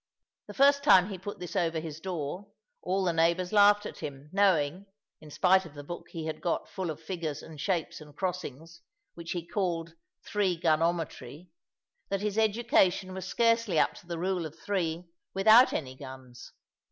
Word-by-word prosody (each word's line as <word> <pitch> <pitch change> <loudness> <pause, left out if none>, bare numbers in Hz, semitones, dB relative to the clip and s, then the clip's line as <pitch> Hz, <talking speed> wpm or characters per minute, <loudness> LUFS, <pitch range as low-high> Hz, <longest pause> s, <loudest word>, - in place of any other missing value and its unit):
The - - -10
first 280 +1 +5
time 190 -10 +6
he 190 -3 -6
put 205 +2 -7
this 180 - -8
over 165 -2 +1
his 160 -1 -7
door, 175 +1 -5 0.3
all 190 +2 0
the 175 -2 +1
neighbours 170 +3 +1
laughed 205 0 +6
at - - -7
him, 140 +1 -8
knowing 190 -2 +2 0.3
(in 155 - -13
spite 190 +5 +3
of 160 -4 -13
the 145 - -8
book 175 +4 -8
he 165 -2 -6
had 160 - -5
got 170 - -1
full 185 -3 -4
of 155 -1 -5
figures 165 -3 -5
and 155 -3 -10
shapes 175 -4 -2
and 150 -1 -14
crossings, 170 -3 -5 0.3
which 170 0 -6
he 175 -2 -4
called 170 -4 -2 0.3
"Three 200 -4 0
gun 160 -2 +2
ometry") 165 -2 -3 0.6
that 195 0 -1
his 210 +1 -1
education 210 -4 +2
was 190 0 -6
scarcely 230 -4 +2
up - - +3
to 175 - -15
the 170 -1 -4
rule 180 -1 -1
of 150 - -15
three, 175 -3 -2 0.3
without 220 +6 +7
any 130 -5 -3
guns. 130 -2 -11
175 Hz, 180 wpm, -29 LUFS, 160-195 Hz, 0.6 s, without